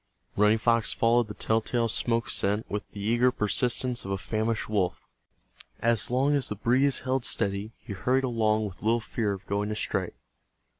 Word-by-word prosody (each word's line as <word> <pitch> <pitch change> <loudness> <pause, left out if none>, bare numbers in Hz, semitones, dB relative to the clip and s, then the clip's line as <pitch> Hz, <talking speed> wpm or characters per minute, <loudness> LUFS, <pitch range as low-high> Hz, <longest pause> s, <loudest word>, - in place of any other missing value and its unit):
Running 105 +2 +4
Fox 115 0 +2
followed 115 0 +2
the 105 - -8
tell 110 0 +1
tale 115 +1 0
smoke 115 +1 0
scent 105 +3 0
with 105 0 -5
the 100 - -10
eager 120 +4 +3
persistence 125 +2 +1
of 95 - -7
a 95 - -1
famished 110 +2 -2
wolf. 95 -4 -1 0.7
As 115 -1 +2
long 135 +4 +2
as 140 -3 0
the 105 - -3
breeze 130 +6 +2
held 130 0 -1
steady 100 0 -1
he 110 - -8
hurried 130 +7 +1
along 110 -3 +1
with 95 -3 -8
little 115 +2 +2
fear 110 -1 -2
of 100 +1 -6
going 100 +1 -2
astray. 105 - -2
115 Hz, 180 wpm, -27 LUFS, 105-120 Hz, 0.7 s, Running